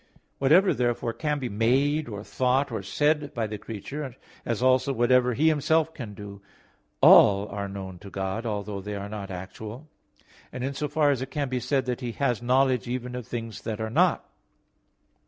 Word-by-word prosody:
Whatever 165 +9 +5
therefore 120 -1 -1
can 150 +2 -1
be 130 -3 -3
made, 130 +7 +1
or 105 -1 -6
thought, 130 +4 0
or 110 -3 -3
said 145 +8 0
by 115 -2 0
the 105 -1 -5
creature, 130 +6 -6 0.3
as 120 +1 -1
also 130 +1 +3
whatever 125 0 +3
He 155 +6 +3
Himself 160 +1 +2
can 110 -8 -8
do, 100 -1 -9 0.6
all 100 0 +7
are 100 0 -4
known 95 -2 -7
to 100 - -11
God, 95 +3 -3
although 105 -3 -3
they 105 +1 -5
are 100 0 -5
not 100 -2 -6
actual. 105 +8 -8 0.6
And 125 - -5
in 135 +1 -2
so 150 +2 -2
far 150 0 +2
it 130 -1 -2
can 140 0 -2
be 130 0 -1
said 130 +2 0
that 125 +1 -3
He 120 -2 -4
has 125 -4 0
knowledge 130 -1 +2
even 125 0 -4
of 125 -3 -6
things 115 -2 -5
that 110 -2 -4
are 110 0 -3
not. - - +2
125 Hz, 185 wpm, -26 LUFS, 105-135 Hz, 0.6 s, all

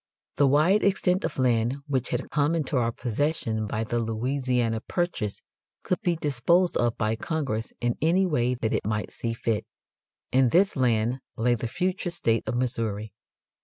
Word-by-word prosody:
The 140 0 +5
wide 155 +10 +4
extent 190 -1 +2
of - - -4
land 120 0 +2
which 130 -4 -1
had 125 +1 -3
come 150 +2 +2
into 150 -3 -1
our 120 -2 +2
possession 115 -3 -1
by 110 +1 -2
the 120 +1 -1
Louisiana 120 0 0
Purchase 175 - -2 0.4
could 185 - -1
be 175 -5 +1
disposed 165 +5 +2
of 120 -1 +1
by 110 0 0
Congress 125 -5 -3
in 120 0 0
any 175 +5 +3
way 125 -7 +1
that 115 -2 -2
it - - 0
might 105 -1 -2
see 115 -1 -3
fit. 115 -2 -1 0.7
In 130 -1 +4
this 190 +9 +3
land 120 -1 +1 0.2
lay 120 +2 +2
the 120 0 -2
future 180 +7 -1
state 115 -10 +1
of - - -1
Missouri. 115 -4 -2
125 Hz, 165 wpm, -26 LUFS, 115-155 Hz, 0.7 s, The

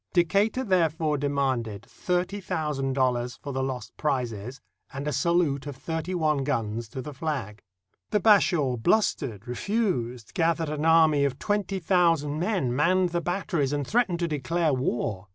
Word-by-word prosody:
Decatur 200 +8 +2
therefore 165 - +1
demanded 130 -7 -1
thirty 180 +7 -2
thousand 150 -6 -2
dollars 125 -2 0
for 140 - -7
the 135 - -1
lost 125 -5 -4
prizes 125 -4 -2 0.3
and 140 +1 -5
a 150 - -1
salute 145 -1 +1
of 145 - -5
thirty 160 +5 -4
one 155 -4 +1
guns 115 -4 -2
to 130 +3 -6
the 150 - -7
flag. 130 -9 -4 0.5
The 210 - +2
Bashaw 175 - +4
blustered, 115 - 0
refused, 125 - -2
gathered 165 -1 +1
an 150 +1 -2
army 160 -3 +5
of 135 -2 0
twenty 205 +2 -1
thousand 165 -5 +2
men, 175 - 0
manned 180 +5 +3
the 170 0 -1
batteries, 170 -6 -1
and 145 -1 -1
threatened 215 - +1
to 170 - +1
declare 155 +1 0
war. 115 -6 -2
150 Hz, 150 wpm, -26 LUFS, 130-175 Hz, 0.5 s, army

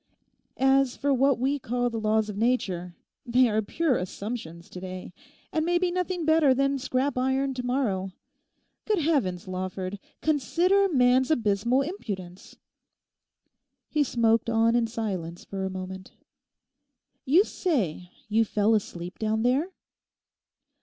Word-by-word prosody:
As 270 -1 +3
for 280 0 +1
what 270 0 +3
we 270 +4 0
call 245 0 -1
the 225 - -3
laws 215 0 +1
of 210 - -6
Nature, 190 -6 -1 0.3
they 250 +1 +3
are 215 -1 +1
pure 280 +5 0
assumptions 180 -3 -6
to 180 - -7
day, 185 -1 -7 0.4
and 315 - +1
may 345 +1 +2
be 355 0 +1
nothing 360 -1 -2
better 315 -4 +4
than 275 +1 +1
scrap 260 0 -1
iron 265 +1 +1
tomorrow. 245 -7 -1 0.7
Good 430 -1 +1
Heavens, 265 - 0
Lawford, 185 +1 -4 0.2
consider 345 - +2
man's 255 -3 +3
abysmal 235 -1 +2
impudence.' 195 - -7 1.3
He 300 -2 +2
smoked 230 -2 +2
on 230 +1 +3
in 235 -1 +2
silence 190 -7 -4
for 195 -1 -4
a - - -2
moment. 190 0 -7 1.1
'You 325 +9 +5
say 205 - -2 0.2
you 220 +1 +3
fell 215 0 +1
asleep 180 -4 -3
down 220 0 0
there? 265 +8 +2
240 Hz, 135 wpm, -27 LUFS, 195-275 Hz, 1.3 s, You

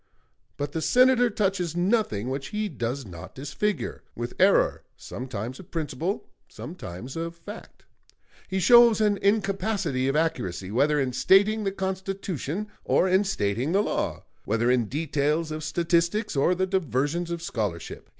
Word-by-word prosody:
But 145 0 -3
the 160 - -3
Senator 250 +3 +4
touches 190 -6 -1
nothing 175 - +1
which 135 +1 -3
he 210 0 -2
does 125 -2 -3
not 85 -4 -10
disfigure 145 +9 -2
with 120 +1 -4
error, 195 +1 +4 0.2
sometimes 125 0 -6
of 190 - -12
principle, 165 +3 -3 0.2
sometimes 125 - -8
of 165 +1 -4
fact. 205 +6 -11 0.6
He 190 0 -1
shows 235 +3 +7
an 210 -2 +3
incapacity 195 -8 +1
of 135 - 0
accuracy, 100 - -1
whether 145 +6 +2
in 130 -2 0
stating 205 - +4
the 195 - +1
Constitution 190 -2 -3 0.2
or 185 - +3
in 190 +2 +4
stating 125 - -1
the 200 +2 +3
law, - - -2 0.2
whether 115 +3 +1
in 125 -2 +2
details 150 +4 -1
of 155 0 -4
statistics 170 +6 0
or 140 +6 +3
the 185 +1 +1
diversions 170 - -1
of 170 -1 -4
scholarship. 105 - -4
165 Hz, 145 wpm, -26 LUFS, 130-195 Hz, 0.6 s, shows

